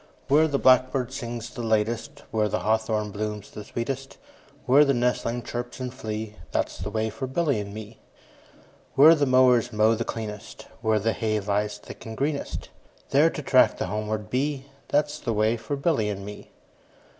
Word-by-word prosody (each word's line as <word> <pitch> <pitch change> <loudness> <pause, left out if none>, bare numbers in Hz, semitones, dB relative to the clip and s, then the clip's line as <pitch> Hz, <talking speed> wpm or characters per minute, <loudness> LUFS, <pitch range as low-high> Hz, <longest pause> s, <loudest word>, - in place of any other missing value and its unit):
Where 155 +3 +5
the 145 -2 0
blackbird 130 0 +3
sings 120 -3 -5
the 120 - -6
latest, 110 0 -1
5 - - -22
Where 110 -2 +1
the - - -1
hawthorn 110 -1 0
blooms 105 0 -4
the 105 - -8
sweetest, 135 +5 -5 0.5
Where 135 +4 +6
the 140 -2 +2
nestlings 120 -1 -1
chirp 120 +2 -5
and 125 -1 -4
flee, 110 -3 -5 0.2
That - - +1
's - - -11
the 90 +4 -4
way 110 +1 -1
for 130 +5 -5
Billy 140 -3 0
and 100 -1 -5
me. 110 +1 -9 1.0
Where 155 +4 +9
the 145 -3 +1
mowers 125 -2 +4
mow 110 +1 +4
the 115 +1 -1
cleanest, 110 -3 -6 0.2
Where 110 -1 +2
the 110 +2 +1
hay 110 -1 0
lies 105 +1 -1
thick - - -12
and 110 0 -7
greenest, 140 +1 -2
10 - - -16 0.4
There - - +5
to - - -6
track - - +4
the - - -2
homeward 105 +2 -3
bee, 135 +1 -1 0.2
That 150 +1 +2
's 150 - -7
the 115 - -2
way 110 +2 +2
for 115 +5 -4
Billy 140 -7 +1
and 100 -1 -5
me. 105 0 -9
115 Hz, 190 wpm, -26 LUFS, 105-130 Hz, 1.0 s, Where